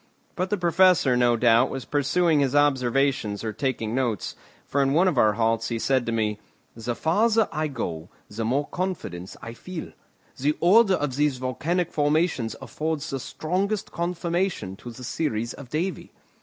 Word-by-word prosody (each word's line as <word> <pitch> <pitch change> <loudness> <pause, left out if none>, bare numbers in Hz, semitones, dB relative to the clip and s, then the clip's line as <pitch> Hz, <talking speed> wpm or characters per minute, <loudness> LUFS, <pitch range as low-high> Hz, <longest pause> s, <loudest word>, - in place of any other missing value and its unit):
But 185 +1 -1
the 210 - 0
Professor, 175 -6 +4
no 120 -1 +3
doubt, 120 +2 +4
was 135 -3 -5
pursuing 150 +4 +2
his 140 -1 +1
observations 135 -6 +1
or 110 -1 -3
taking 115 -3 -2
notes, 120 -6 -1 0.3
for 140 - 0
in 135 0 +2
one 175 +5 +4
of 185 - +1
our 105 -1 +5
halts 115 +1 +1
he 115 - -1
said 130 +1 +1
to - - 0
me: 105 -2 -1 0.4
"The 115 +1 -3
farther 215 - +2
I 155 -1 -1
go 85 - -5 0.2
the 110 +2 -5
more 135 +6 +1
confidence 155 - -5
I 115 - -6
feel. 175 +7 -7 0.5
The 150 +3 +1
order 195 +2 +5
of 140 -5 -2
these 145 -3 +2
volcanic 150 +8 -1
formations 150 -5 +1
affords 155 -1 -3
the 135 - -2
strongest 195 - -2
confirmation 170 - -2
to 120 - -9
the 120 +2 -10
theories 120 -4 -2
of 135 -3 -11
Davy. 170 +7 -3
140 Hz, 170 wpm, -25 LUFS, 115-170 Hz, 0.5 s, our